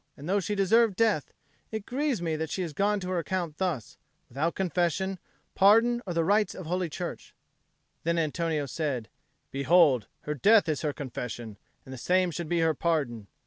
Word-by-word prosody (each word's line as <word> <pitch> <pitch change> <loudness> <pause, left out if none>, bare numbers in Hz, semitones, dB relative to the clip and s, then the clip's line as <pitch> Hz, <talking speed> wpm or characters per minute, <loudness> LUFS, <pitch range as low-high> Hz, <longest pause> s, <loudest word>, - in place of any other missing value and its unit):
And 145 - -9
though 200 +3 +2
she 205 +2 -2
deserved 210 +2 +3
death, 215 -8 +1 0.4
it 220 -2 -5
grieves 265 - -1
me 160 -2 0
that 160 0 -3
she 185 - -2
is 165 -4 -5
gone 205 +4 +1
to 180 - -4
her 180 - +1
account 170 -3 -3
thus, 170 - -2 0.3
without 150 +7 -1
confession, 185 +1 0 0.3
pardon, 225 +5 +5
or 175 - -3
the 165 - +2
rites 205 +4 +2
of 185 - -7
Holy 180 +1 -1
Church. - - -6 0.7
Then 170 +1 0
Antonio 160 -1 0
said, 135 -5 -3 0.4
"Behold, 140 - +4
her 150 - -3
death 205 - +5
is 155 -3 -1
her 150 - 0
confession, 120 -6 -6 0.3
and 130 - -9
the 130 - -8
same 180 +3 +2
should 165 0 -5
be 170 -1 +1
her 160 -1 +3
pardon. 135 -10 -1
170 Hz, 185 wpm, -28 LUFS, 150-195 Hz, 0.7 s, pardon